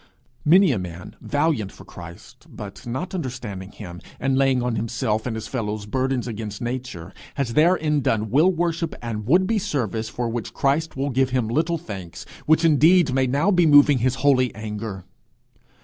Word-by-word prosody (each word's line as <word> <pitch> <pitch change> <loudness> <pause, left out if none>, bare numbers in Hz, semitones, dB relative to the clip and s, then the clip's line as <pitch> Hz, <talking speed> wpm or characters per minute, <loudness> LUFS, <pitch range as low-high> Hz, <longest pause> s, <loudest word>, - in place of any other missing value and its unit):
Many 180 +2 +5
a 115 - 0
man 90 -1 -8
valiant 145 -9 0
for - - -14
Christ, 85 -1 -12
but - - -10
not 130 +11 -4
understanding 110 - -5
him, 90 -4 -10 0.2
and 135 -1 0
laying 135 -2 +2
on 125 -2 -1
himself 110 0 -2
and 115 - -3
his 110 0 -5
fellows 105 -4 -3
burdens 130 +2 -1
against 105 -2 -5
nature, 120 -8 -5 0.2
has 125 -4 -2
therein 155 -1 +3
done 110 -3 0
will 155 +9 +4
worship 170 -1 -2
and 110 -2 -4
would 180 +7 +4
be 220 +2 +1
service 115 - -2
for 120 +1 -3
which 115 -1 -5
Christ 145 +2 0
will 140 +1 -1
give 130 +1 +1
him 125 -3 0
little 160 +8 0
thanks, 95 - -8 0.2
which 160 +2 +4
indeed 160 0 +5
may 130 0 +2
now 145 +10 +2
be 175 -3 +4
moving 145 -2 +6
his 130 +2 +1
holy 130 -3 +4
anger. 105 -3 -6
130 Hz, 175 wpm, -23 LUFS, 110-150 Hz, 0.2 s, moving